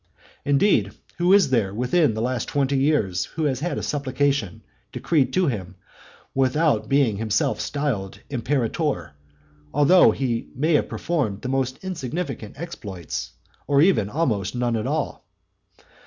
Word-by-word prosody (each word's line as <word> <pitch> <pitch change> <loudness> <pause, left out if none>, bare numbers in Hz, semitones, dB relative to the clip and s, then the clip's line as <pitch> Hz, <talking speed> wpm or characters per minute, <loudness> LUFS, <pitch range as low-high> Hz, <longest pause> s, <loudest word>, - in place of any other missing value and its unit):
Indeed, 140 - +3 0.3
who 175 +1 +3
is 195 -8 +5
there 105 -6 +1
within 125 +2 +2
the 110 - -2
last 125 -1 -1
twenty 140 -1 0
years 135 - +1
who 160 - -5
has 135 -4 0
had 175 +4 -2
a - - -3
supplication 140 - -1 0.3
decreed 150 -6 +1
to 185 0 +3
him 95 - -3 0.6
without 135 +4 +1
being 135 -7 +3
himself 110 -1 0
styled 130 -10 -3
imperator, 125 - -1 0.6
though 160 +6 +6
he 120 -4 -1
may 155 +5 +1
have 150 - +2
performed 130 - -2
the 130 - -3
most 130 +1 -1
insignificant 140 - -5
exploits, 100 - -6 0.3
or 140 -1 +3
even 145 - +4
almost 110 - -1
none 120 -1 0
at 110 - -2
all. - - -2
135 Hz, 140 wpm, -23 LUFS, 110-150 Hz, 0.6 s, though